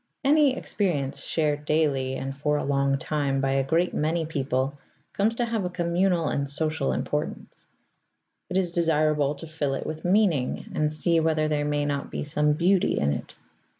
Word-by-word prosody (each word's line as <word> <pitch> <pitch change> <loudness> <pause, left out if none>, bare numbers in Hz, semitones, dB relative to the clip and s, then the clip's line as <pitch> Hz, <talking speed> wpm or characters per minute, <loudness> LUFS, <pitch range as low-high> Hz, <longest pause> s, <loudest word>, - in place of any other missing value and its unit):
Any 280 -1 +4
experience 150 -9 -1
shared 150 -2 0
daily 140 -4 +1
and 135 +1 -4
for 150 +1 0
a - - -2
long 140 0 +1
time 140 -1 -1
by 135 0 +1
a 135 0 +2
great 165 +6 +1
many 160 +2 0
people 140 -2 -2 0.3
comes 215 +3 +1
to 240 - 0
have 230 -3 -2
a 180 - -1
communal 175 -1 +1
and 140 -1 -1
social 155 - 0
importance; - - -4 0.8
it 180 - -1
is 180 -3 0
desirable 155 -4 +2
to 165 - -9
fill 155 -4 -2
it - - -5
with 155 0 -5
meaning 180 -8 +1
and 150 0 +1
see 165 +2 +2
whether 155 -1 +1
there 150 -1 0
may 145 0 0
not 145 -1 -2
be - - -4
some 150 0 +1
beauty 180 +4 +2
in 70 0 +1
it. - - -5
155 Hz, 180 wpm, -26 LUFS, 140-170 Hz, 0.8 s, Any